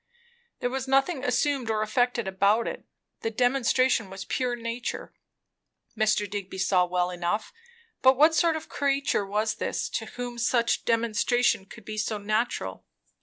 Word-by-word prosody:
There 245 - -1
was 265 0 -3
nothing 270 +2 +2
assumed 255 -1 0
or 215 -1 +1
affected 240 0 0
about 200 +4 +2
it; - - -6 0.3
the 225 - -2
demonstration 245 -1 +2
was 195 +1 -7
pure 250 -1 -1
nature, 235 +1 -5 0.8
Mr. 215 -1 +2
Digby 195 -2 -6
saw 185 -1 +3
well 180 0 0
enough; 180 - -2 0.5
but 260 0 +6
what 310 +3 +6
sort 320 +1 +3
of 315 - -5
a - - -28
creature 275 -7 0
was 215 +2 0
this, - - -2
to - - -3
whom 245 -1 -6
such 235 0 +2
a - - -25
demonstration 230 -1 +1
could 220 0 -13
be 215 0 -2 0.2
natural? 215 +3 -2
235 Hz, 155 wpm, -27 LUFS, 210-255 Hz, 0.8 s, but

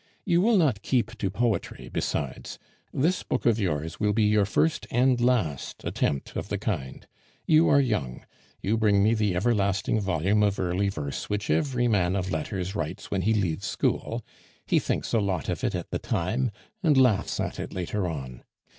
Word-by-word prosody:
You 175 -2 +3
will 225 +2 +4
not 135 - +2
keep 120 0 0
to 100 - 0
poetry 110 -1 -2
besides; 70 -3 -3 0.3
this 170 +7 +1
book 130 - -3
of 115 -2 +3
yours 80 -5 -2
will 105 -1 +2
be 110 +1 +2
your 105 -1 +3
first 160 +9 +1
and 125 0 +2
last 110 - 0
attempt 70 -2 -2
of - - -4
the - - -1
kind. 65 0 -4 0.4
You 160 +1 +5
are 140 - +6
young; 105 - -1 0.4
you 110 +4 +1
bring 105 -3 +3
me 110 +2 +4
the 105 -5 +1
everlasting 100 0 +1
volume 95 +2 +1
of 100 -1 +1
early 95 +2 0
verse 75 -7 -5
which 105 0 -1
every 130 -6 +1
man 95 -5 +2
of 95 -1 -2
letters 90 +4 -3
writes 80 -7 -5
when 95 - 0
he 110 +4 +2
leaves 90 -7 -1
school, - - -1 0.4
he - - +3
thinks - - -2
a 115 - +4
lot 95 -7 -1
of - - -3
it - - 0
at - - -5
the - - -1
time, 115 +9 -1 0.3
and 155 -7 +3
laughs 125 -7 +3
at - - -3
it - - -5
later 95 +2 -2
on. 65 -7 -6
105 Hz, 185 wpm, -26 LUFS, 90-120 Hz, 0.4 s, are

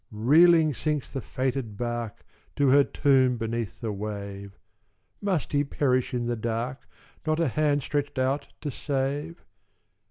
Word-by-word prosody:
"Reeling 155 +8 +5
sinks 150 +1 -2
the 135 - -3
fated 130 -5 -3
bark 120 -2 -4 0.3
To 140 -2 +3
her 140 +2 +6
tomb 130 -3 +3
beneath 115 -2 -4
the 115 -2 -2
wave: 100 -1 -6 0.6
Must 190 -7 -1
he 145 0 +2
perish 130 -3 0
in 120 -1 -1
the 120 0 -1
dark 115 +3 -3 0.4
Not 155 +1 +1
a 165 -4 +2
hand 145 +1 +1
stretched 145 0 -2
out 135 +2 0
to 150 - -3
save? 145 +4 -3
130 Hz, 140 wpm, -27 LUFS, 115-145 Hz, 0.6 s, her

